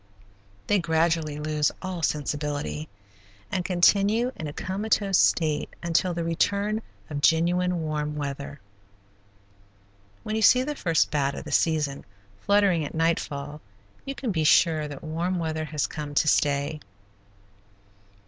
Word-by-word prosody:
They 205 - +2
gradually 160 -2 0
lose 150 0 0
all 185 -2 -5
sensibility, 145 - -2 0.6
and 185 - -1
continue 200 +7 +3
in 155 - -5
a - - -5
comatose 195 +2 0
state 155 -3 +2
until 170 +2 +1
the 170 - -2
return 200 +6 0 0.3
of 145 -1 -3
genuine 175 +2 +2
warm 150 -1 -2
weather. 140 -1 -5 1.6
When 215 - -3
you 220 - 0
see 255 +3 +6
the 295 +3 -3
first 165 - +1
bat 140 -2 0
of - - -6
the - - -8
season 150 -4 +1 0.4
fluttering 200 - +3
at 145 - -6
nightfall 150 -3 -1 0.4
you 275 - -5
can 250 -5 -3
be 160 -4 0
sure 155 -1 +4
that 145 -2 -9
warm 170 +4 -2
weather 160 -2 -2
has 150 -1 -1
come 150 -2 -6
to 155 - +3
stay. 145 +1 +1
160 Hz, 135 wpm, -26 LUFS, 150-185 Hz, 1.6 s, see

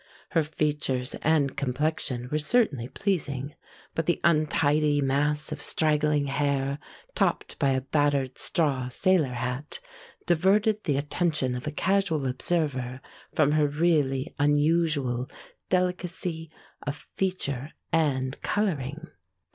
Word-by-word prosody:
Her 165 - +2
features 145 -4 -1
and 150 -3 +2
complexion 135 -2 -1
were 150 - +1
certainly 150 - +2
pleasing, 145 -7 -2 0.4
but 165 - -2
the 175 - +2
untidy 150 -2 +3
mass 145 +3 +1
of 150 -1 -5
straggling 150 -2 +2
hair 140 0 0 0.3
topped - - 0
by 140 - +3
a 130 -1 +1
battered 140 -1 0
straw 135 -6 +1
sailor 155 -1 +2
hat 125 +4 -3 0.5
diverted 200 +5 +2
the 145 -5 +1
attention 150 -2 0
of 125 +4 -5
a - - -1
casual 185 -3 +1
observer 130 -2 0 0.4
from 150 -2 +4
her 150 -1 +3
really 145 -3 +1
unusual 145 -4 +2 0.4
delicacy 180 -2 -1 0.3
of 145 0 -6
feature 155 -7 -1 0.2
and 135 -4 +1
coloring. 160 -7 -1
150 Hz, 115 wpm, -27 LUFS, 135-160 Hz, 0.5 s, from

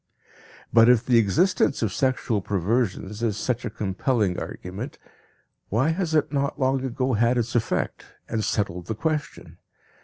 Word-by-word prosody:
But 115 +1 +7
if 125 -1 +4
the 120 -2 +5
existence 125 - +2
of 105 -3 -1
sexual 125 -5 0
perversions 100 +2 -1
is 110 -4 0
such 120 +3 -2
a - - -2
compelling 105 -1 -1
argument, 100 +10 -7 0.7
why 125 +9 +2
has 165 -1 -1
it 150 -1 +1
not 140 +1 -1
long 135 0 +1
ago 130 0 -1
had 120 +3 +2
its 120 0 -1
effect, 120 -2 -1 0.2
and 110 -1 -2
settled 90 -5 -2
the 110 - -2
question? 155 +4 -3
115 Hz, 150 wpm, -25 LUFS, 105-130 Hz, 0.7 s, But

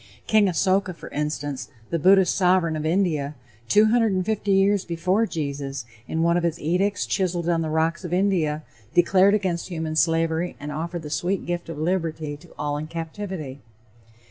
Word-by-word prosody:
King 215 -2 +4
Asoka, 185 0 +1
for - - -10
instance, 145 -2 -3 0.2
the 170 - 0
Buddhist 190 +2 +5
sovereign 180 -3 +2
of 155 0 -2
India, 160 -5 0 0.3
250 215 - +3
years 195 0 +3
before 185 +6 0
Jesus, 140 - -4 0.2
in 160 0 -1
one 170 +1 +3
of - - +1
his 170 -1 -1
edicts 185 +6 0
chiseled 175 -3 -1
on 170 -1 +2
the 160 - -2
rocks 160 +3 0
of 175 - -5
India, 175 -5 +1 0.3
declared 190 +3 +5
against 185 -5 -1
human 160 -3 -4
slavery 165 +1 +1
and 145 +1 -6
offered 165 +3 -4
the 150 - -7
sweet 185 +4 -1
gift 175 0 -3
of 165 - -6
liberty 160 -2 -2
to 155 +4 -16
all 145 0 -2
in 155 +1 -5
captivity. 165 -3 -6
170 Hz, 165 wpm, -24 LUFS, 155-190 Hz, 0.3 s, Buddhist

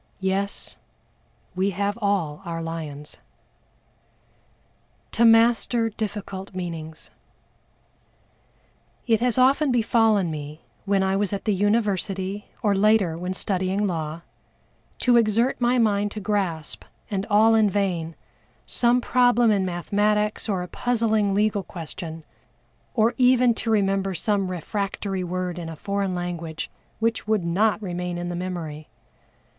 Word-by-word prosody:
Yes, 195 +1 -1 0.8
we 190 +2 +1
have 200 +2 -1
all 185 -7 0
our 170 -2 -4
lions! 155 -3 -6 1.9
To 235 - +1
master 230 0 +4
difficult 200 -3 -6
meanings. 165 -3 -6 1.9
It 225 -3 +3
has 245 0 +1
often 270 +3 +4
befallen 225 -6 +3
me, 150 0 -7 0.2
when 195 -1 +2
I 190 0 +1
was 205 0 0
at 200 - -4
the 215 - +2
University, 200 -1 0 0.2
or 205 -2 +3
later 200 -4 +3
when 180 +2 -4
studying 190 +1 -1
law, 165 -3 -3 0.8
to 245 -1 +5
exert 230 +3 +2
my 245 +1 +3
mind 205 -3 +2
to 215 - -5
grasp, 190 -6 -2 0.3
and 195 0 -2
all 220 +2 +5
in 220 -2 +4
vain, 180 -5 -1 0.5
some 245 +1 +2
problem 245 -2 +4
in 195 -2 +2
mathematics 210 +5 0
or 190 -3 0
a - - -7
puzzling 220 -2 +1
legal 210 0 +2
question, 165 -2 -8 0.7
or 225 0 +3
even 250 -1 +5
to 225 - -3
remember 195 -3 +1
some 200 -1 0
refractory 195 +1 -3
word 180 0 -3
in 165 -1 -6
a 160 - -7
foreign 200 +2 -2
language 170 -3 -5 0.3
which 225 -1 -1
would 215 -5 +1
not 205 +6 +2
remain 180 -1 -3
in 175 0 -4
the 175 - -3
memory. 170 -4 -5
200 Hz, 130 wpm, -24 LUFS, 180-220 Hz, 1.9 s, to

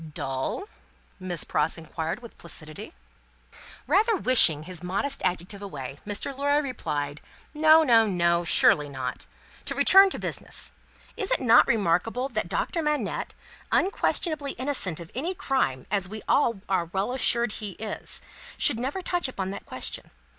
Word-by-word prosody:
"Dull?" 135 - -3 0.6
Miss 180 -3 -3
Pross 150 +3 0
inquired, 165 +6 -5
with 235 - -11
placidity. 155 - -7 0.9
Rather 420 - +3
wishing 200 - +6
his 180 0 -8
modest 200 +11 -2
adjective 180 +3 -2
away, 140 -8 -7
Mr. 205 +6 -2
Lorry 285 +2 +2
replied, 150 - -4 0.3
"No, 315 +1 +6
no, 230 -6 +5
no. 170 -2 +2
Surely 150 -3 +3
not. 130 -2 -5 0.4
To - - -2
return 390 +1 +7
to - - -5
business: - - -6 0.4
Is 400 -4 -2
it - - +1
not 240 -2 +6
remarkable 225 +5 +1
that 215 -7 -3
Doctor 335 - -1
Manette, 300 -1 -2 0.4
unquestionably 310 -6 0
innocent 255 - -2
of 170 -1 -10
any 335 +9 -2
crime 265 - -1
as 195 -3 0
we 215 +1 -7
are 240 -5 +3 0.2
all 175 -3 +1
well 195 +6 -1
assured 240 -3 +2
he 210 -2 -5
is, 215 +3 -5 0.3
should 225 - +3
never 280 +10 -3
touch 355 -4 0
upon 190 -7 -4
that 200 - -8
question? - - -4
215 Hz, 145 wpm, -26 LUFS, 170-280 Hz, 0.9 s, return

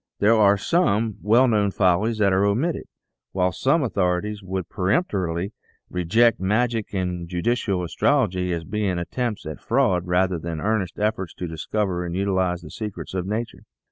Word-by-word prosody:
There 105 +3 +4
are 100 -2 +5
some 110 - +1
well 120 +5 +4
known 105 -4 +2
follies 100 +4 +2
that 100 -3 +3
are 95 +1 +3
omitted, 125 +12 0 0.5
while 90 -1 +1
some 135 - +1
authorities 100 -1 -1
would 95 -2 -4
peremptorily 95 - -1 0.4
reject 110 +7 +3
Magic 110 +3 0
and 90 -2 -3
Judicial 95 0 0
Astrology 90 - +1
as 85 -1 -2
being 100 0 -1
attempts 110 +5 -3
at 80 0 -7
fraud 95 -9 +1
rather 90 0 +1
than 85 0 -5
earnest 100 -3 -1
efforts 105 -4 -1
to 90 - -5
dis 80 -1 -7
cover 95 -5 -1
and 85 0 -4
utilize 95 -2 0
the 75 - -11
secrets 105 -4 -6
of 90 -1 -2
nature. 110 +3 -3
100 Hz, 160 wpm, -23 LUFS, 90-110 Hz, 0.5 s, are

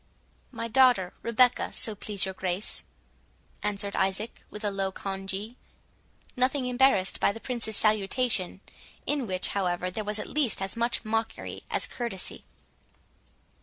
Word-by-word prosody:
"My 230 -2 -4
daughter 240 -6 +4
Rebecca, 245 +2 +3
so 220 - +1
please 205 -1 0
your 190 - -4
Grace," 185 +2 -2 0.8
answered 200 -1 -1
Isaac, 195 +4 -1
with 210 - -8
a 205 - +1
low 195 -1 -1
congee, 195 +4 -4 0.8
nothing 255 +1 +2
embarrassed 250 -6 +3
by - - +4
the 225 - -8
Prince's 230 -3 -2
salutation, 210 -2 +2 0.4
in 285 -5 0
which, 185 -1 +3
however, 180 -2 -1
there 215 +3 -3
was 210 +1 0
at 210 - -3
least 285 -7 +2
as 195 +2 -2
much 235 0 0
mockery 225 +1 -2
as - - +1
courtesy. 235 -7 -4
210 Hz, 135 wpm, -28 LUFS, 195-240 Hz, 0.8 s, daughter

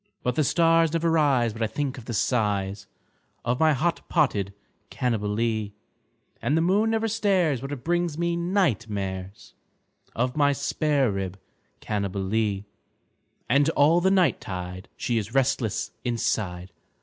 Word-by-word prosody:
But 125 - +1
the 155 - +1
stars 165 +2 +3
never 165 0 +1
rise 135 -8 +3
but 115 - -8
I 110 - +2
think 140 +3 -3
of 115 - -13
the 120 - -4
size 100 - 0 0.6
Of 120 +1 0
my 155 -1 +5
hot 165 +5 0
potted 105 - +1 0.4
Cannibalee, 110 -2 -1 0.7
And 150 - +1
the - - +3
moon 200 +6 +3
never 225 0 +1
stares 190 - +1
but 135 +1 -6
it 140 -4 -6
brings 175 -2 0
me 170 0 0
night 170 - 0
mares 95 - -5 0.6
Of 125 +2 0
my 145 -1 +3
spare 140 -2 +1
rib 95 -1 -4 0.4
Cannibalee; 100 0 -1 0.8
And 140 +4 +3
all 160 +5 +5
the 190 - +3
night 185 -8 +3
tide 90 0 -6
she 120 -2 0
is 110 +3 -7
restless 125 -5 0
inside. 95 -7 -2
125 Hz, 145 wpm, -25 LUFS, 105-160 Hz, 0.8 s, my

